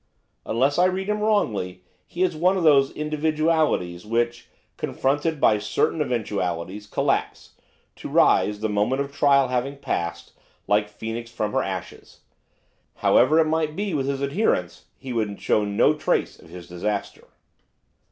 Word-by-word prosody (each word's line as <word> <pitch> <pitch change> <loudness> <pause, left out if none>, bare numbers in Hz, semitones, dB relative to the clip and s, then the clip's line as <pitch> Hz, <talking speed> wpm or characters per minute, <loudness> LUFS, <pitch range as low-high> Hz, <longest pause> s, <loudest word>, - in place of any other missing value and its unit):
Unless 135 +7 +1
I 180 - +5
read 190 +2 -1
him 210 0 0
wrongly 105 - 0 0.2
his 185 +1 0
is - - -11
one 180 +5 +2
of 180 - -1
those 140 -3 +5
individualities 155 - 0
which, 120 +2 -2 0.3
confronted 145 +3 -1
by 105 -5 +4
certain 105 +9 0
eventualities, 105 - -3
collapse, - - -1 0.5
to - - -7
rise, 105 0 +3
the 110 - 0
moment 105 +6 0
of 140 0 -11
trial 140 -3 +4
having 130 +3 -2
passed, 85 -10 -4 0.3
like 105 0 +1
Phoenix 115 +3 -6
from 110 -3 -3
her - - +1
ashes. 95 -2 -7 0.7
However 150 +5 +4
it 165 - +5
might 155 -1 -1
be 200 -1 -2
with 135 -3 -1
his 140 0 -2
adherents, 140 - -1
he 130 -2 -7
would 105 -3 -2
show 105 - +1
no 100 0 +3
trace - - -1
of - - -17
his 90 0 -10
disaster. 100 +4 -4
125 Hz, 150 wpm, -24 LUFS, 105-155 Hz, 0.7 s, I